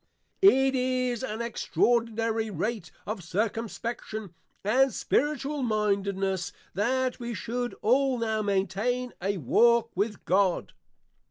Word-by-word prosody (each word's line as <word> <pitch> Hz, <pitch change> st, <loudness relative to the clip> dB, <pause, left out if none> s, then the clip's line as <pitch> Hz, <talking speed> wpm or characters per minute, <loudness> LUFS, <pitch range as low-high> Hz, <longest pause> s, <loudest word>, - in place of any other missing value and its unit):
It 270 Hz, -9 st, +6 dB
is 255 Hz, -2 st, 0 dB
at -, -, -2 dB
an 220 Hz, +2 st, -4 dB
extraordinary 230 Hz, -1 st, 0 dB
rate 205 Hz, -1 st, -3 dB, 0.2 s
of 210 Hz, -3 st, -4 dB
Circumspection 220 Hz, +1 st, -3 dB, 0.3 s
and 255 Hz, +6 st, +3 dB
Spiritual 290 Hz, +4 st, 0 dB
mindedness, 200 Hz, -4 st, 0 dB, 0.2 s
that 255 Hz, +5 st, 0 dB
we 240 Hz, -1 st, -4 dB
should 240 Hz, +5 st, -3 dB
all 260 Hz, +3 st, +3 dB
now 220 Hz, -2 st, 0 dB
maintain 210 Hz, +5 st, -1 dB
a 195 Hz, +2 st, 0 dB
walk 235 Hz, -, +3 dB
with 210 Hz, +3 st, -2 dB
God. 190 Hz, -1 st, +1 dB
230 Hz, 110 wpm, -28 LUFS, 200-250 Hz, 0.3 s, It